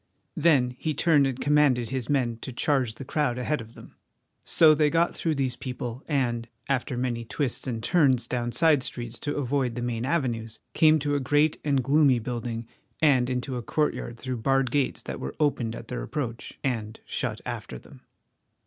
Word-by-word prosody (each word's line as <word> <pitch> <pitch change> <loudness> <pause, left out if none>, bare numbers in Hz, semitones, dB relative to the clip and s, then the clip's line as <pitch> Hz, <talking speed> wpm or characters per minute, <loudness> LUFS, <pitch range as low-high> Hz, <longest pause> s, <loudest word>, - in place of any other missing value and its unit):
Then 140 -6 +3
he 155 -2 -2
turned 145 -3 +4
and 135 -1 -3
commanded 140 -6 +3
his 130 -3 -3
men 125 -5 +1
to 130 - -6
charge 130 -2 0
the 135 - -8
crowd 145 -4 0
ahead 125 +2 -1
of 115 +1 -13
them. - - -13 0.5
So 160 -2 +6
they 150 0 +3
got 170 +2 +2
through 160 -2 -1
these 130 -3 -1
people 125 -1 -5
and, 120 -6 0 0.2
after 130 -2 -1
many 120 -2 -1
twists 130 +2 -2
and 115 -3 -3
turns 130 -6 +3
down 120 -1 -2
side 155 0 +4
streets 120 -1 -5
to 145 - -3
avoid 130 -3 0
the 120 - -3
main 120 -1 -2
avenues, 120 -7 -1 0.2
came 155 -1 +5
to 145 -1 -1
a 145 - +2
great 145 +3 +2
and 140 -3 +1
gloomy 140 -1 +4
building 115 0 -4 0.3
and 130 -5 +4
into 125 0 -2
a - - -3
courtyard 120 -2 -1
through 130 +1 -4
barred 135 +2 +1
gates 140 -1 0
that - - -6
were 65 - -5
opened 120 -6 0
at - - -9
their - - -4
approach 120 - -5
and 115 -4 -2
shut - - -3
after 65 - -5
them. - - -16
130 Hz, 185 wpm, -26 LUFS, 120-145 Hz, 0.5 s, So